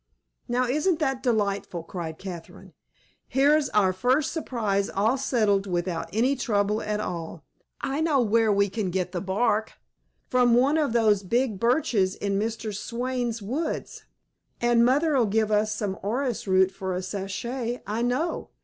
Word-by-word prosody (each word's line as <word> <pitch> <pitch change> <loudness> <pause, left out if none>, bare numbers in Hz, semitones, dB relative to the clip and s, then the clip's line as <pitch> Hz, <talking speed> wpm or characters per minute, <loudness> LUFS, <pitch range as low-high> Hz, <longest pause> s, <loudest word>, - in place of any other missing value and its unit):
"Now, 250 +1 +1
isn't 305 +7 +1
that 270 -5 -1
delightful!" 200 -8 -1
cried 165 -2 -6
Catherine. 175 -4 -9 0.5
"Here's 285 +2 +3
our 190 -3 +3
first 255 +10 +1
surprise 215 - -1
all 215 +6 +1
settled 215 -7 +1
without 175 -2 -2
any 245 +7 +2
trouble 210 -4 0
at 210 0 -2
all. 170 -5 -5 0.4
I 275 +3 -1
know 315 -4 +2
where 225 -1 +3
we 200 0 +3
can 200 -1 -3
get 180 0 -2
the 180 -2 -3
bark, 210 +2 0 0.5
from 245 -2 +4
one 275 +6 +3
of 290 -7 0
those 215 -4 +3
big 225 +1 0
birches 230 -6 +2
in 200 -1 -1
Mr. 220 0 -3
Swayne's 240 +1 -3
woods, 270 +11 -4 0.5
and 240 -1 +3
mother'll 270 -1 +3
give 215 +1 +1
us 210 0 +2
some 205 -3 -2
orris 240 +2 -2
root 190 0 +4
for 190 -1 -4
a 185 - -3
sachet, 230 +6 -4
I 215 +3 -2
know. 255 +8 -1
220 Hz, 150 wpm, -26 LUFS, 195-255 Hz, 0.5 s, from